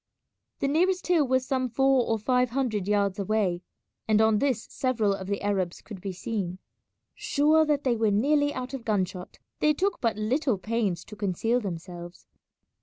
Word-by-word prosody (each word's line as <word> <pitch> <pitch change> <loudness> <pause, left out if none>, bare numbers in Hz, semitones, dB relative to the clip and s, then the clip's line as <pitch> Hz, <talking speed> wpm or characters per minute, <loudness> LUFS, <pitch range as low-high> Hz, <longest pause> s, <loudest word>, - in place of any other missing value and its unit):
The 275 - +2
nearest 365 +6 +1
hill 330 -6 +3
was 260 0 +1
some 260 -1 -1
four 270 +1 +3
or 225 - +1
five 250 +3 +1
hundred 230 -6 -1
yards 200 -1 +1
away, 195 -3 0 0.5
and 215 -1 +3
on 220 -1 +4
this 255 -4 0
several 230 -6 0
of 190 -1 -6
the 200 0 -3
Arabs 190 -4 -1
could 205 -4 -10
be 195 - -4
seen. 185 -1 -4 0.6
Sure 310 +2 +3
that 295 -2 +1
they 250 -3 +2
were 220 -1 +2
nearly 290 +8 +2
out 255 -1 -5
of 265 -3 -5
gun 205 -4 +1
shot, 180 0 -10 0.2
they 300 0 +3
took 390 +5 -1
but 230 -3 0
little 245 +2 0
pains 200 -4 -2
to 210 - -11
conceal 210 +4 0
themselves. 175 -3 -7
225 Hz, 180 wpm, -27 LUFS, 200-270 Hz, 0.6 s, on